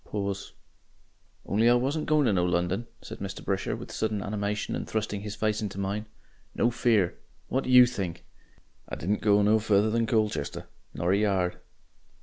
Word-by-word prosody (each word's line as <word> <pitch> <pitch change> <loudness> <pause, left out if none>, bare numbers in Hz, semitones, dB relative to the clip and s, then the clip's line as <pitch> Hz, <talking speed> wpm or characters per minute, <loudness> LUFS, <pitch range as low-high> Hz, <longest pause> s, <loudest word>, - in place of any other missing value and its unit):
Pause. 100 -1 -4 0.9
"On'y 110 +4 +3
I 120 - +6
wasn't 140 +5 0
going 150 -2 +3
to 110 - +3
no 90 -2 +2
London," 90 +5 0 0.2
said - - -8
Mr. 95 -1 -6
Brisher, 95 -1 -1
with - - -9
sudden 105 -3 -2
animation, 105 0 -2
and - - -5
thrusting 105 -2 -2
his 105 0 -6
face 110 0 0
into 100 -3 -4
mine. 100 +2 -3 0.5
"No 120 - +2
fear! 115 -6 +1 0.3
What 130 - 0
do - - -4
YOU 125 -1 +9
think? 100 -9 -4 0.6
"I - - -4
didn't 100 +5 -1
go 105 -1 +4
no 110 +2 +4
further 105 0 +2
than 115 0 +1
Colchester 110 -8 -1 0.3
not 85 +2 -1
a 100 - +4
yard. 95 -4 0
105 Hz, 175 wpm, -27 LUFS, 100-115 Hz, 0.9 s, YOU